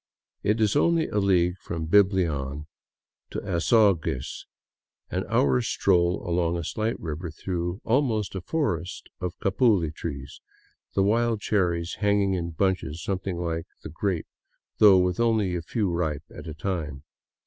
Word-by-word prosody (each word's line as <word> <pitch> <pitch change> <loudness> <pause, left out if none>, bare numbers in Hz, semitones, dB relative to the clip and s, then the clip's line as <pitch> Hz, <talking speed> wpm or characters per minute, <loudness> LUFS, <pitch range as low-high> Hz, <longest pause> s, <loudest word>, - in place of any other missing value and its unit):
It 105 +3 +1
is 110 +1 +2
only 165 +2 +3
a 105 - 0
league 90 -2 +2
from 80 -2 -5
Biblian 80 -7 +2 0.6
to - - -4
Azogues; 90 - +1 0.6
an - - -1
hour's 65 -3 +2
stroll 90 -1 +2
along 85 0 +1
a 85 - -3
slight 110 +8 -2
river 80 +1 -5
through 85 +4 -4
almost 115 -4 +1
a 95 - -4
forest 100 - -2
of 90 -1 -4
capuli 95 - +2
trees, 70 -4 -7 0.5
the 95 - +3
wild 115 +2 +2
cherries 85 -5 0
hanging 100 -2 +2
in 85 -2 -2
bunches 85 -2 -1
something 95 -2 -2
like 85 -1 -3 0.2
the - - -6
grape, 90 +1 -2 0.5
though 100 -3 +8
with 90 +1 +1
only 110 -6 +2
a 85 - -2
few 105 +5 -1
ripe 80 -4 -1
at - - -9
a 80 - -6
time. 75 -5 -4
90 Hz, 145 wpm, -26 LUFS, 85-105 Hz, 0.6 s, though